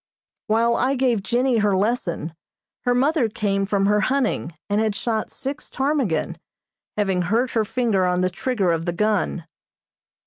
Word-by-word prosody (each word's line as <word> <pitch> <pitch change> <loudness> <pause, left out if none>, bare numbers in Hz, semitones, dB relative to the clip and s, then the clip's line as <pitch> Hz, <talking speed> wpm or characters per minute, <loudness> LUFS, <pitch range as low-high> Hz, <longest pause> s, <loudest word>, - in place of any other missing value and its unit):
While 230 +2 +3
I 265 +2 +1
gave 250 -5 +1
Jennie 240 +3 +1
her 205 -2 +2
lesson 190 -6 -1 0.5
her 245 0 +3
mother 270 -1 +2
came 195 -2 -1
from 200 -1 +1
her 210 +1 +3
hunting, 235 - 0
and 205 +1 +1
had 215 -2 0
shot 220 -1 -2
six 275 +2 -6
ptarmigan, 270 - -1 0.6
having 195 -3 +1
hurt 225 +8 +1
her 225 - +1
finger 225 -4 +1
on 180 0 +1
the 185 0 +1
trigger 200 -2 0
of 165 0 -1
the 175 - 0
gun. 205 -3 0
215 Hz, 160 wpm, -23 LUFS, 195-245 Hz, 0.6 s, While